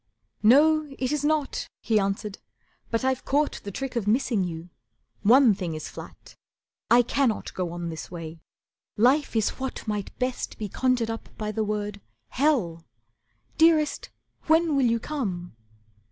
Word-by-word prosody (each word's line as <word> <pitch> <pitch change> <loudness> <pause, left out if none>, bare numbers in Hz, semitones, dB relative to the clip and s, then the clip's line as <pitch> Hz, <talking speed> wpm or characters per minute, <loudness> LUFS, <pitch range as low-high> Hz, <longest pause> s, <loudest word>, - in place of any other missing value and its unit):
"No, 300 +6 +5
it 255 0 -1
is 300 -1 -1
not," 300 -1 0
he 220 -2 +2
answered, 195 +1 -2 0.5
"but 230 +2 -1
I've 260 -1 0
caught 290 +2 0
The 205 - -5
trick 265 +6 -5
of 225 -4 -1
missing 225 -2 +2
you. 170 0 -6 0.5
One 240 +2 +6
thing 180 -4 -4
is 155 - -6
flat, - - -11 0.6
I 240 +1 +6
cannot 245 -2 0
go 180 -2 -3
on 175 0 -4
this 160 -1 -7
way. 165 -2 -8 0.6
Life 260 +5 +3
is 220 -2 +2
what 260 -3 -5
Might 210 -2 -3
best 255 0 -3
be 210 -2 -4
conjured 250 0 +1
up 225 - -7
by 215 -1 -3
the 220 0 -1
word: 210 -1 -3 0.3
'Hell'. 235 - +1 0.8
Dearest, 320 -2 +3 0.4
when 320 -1 +4
will 270 -3 +3
you 230 0 +2
come?" 195 - -4
230 Hz, 155 wpm, -26 LUFS, 200-275 Hz, 0.8 s, One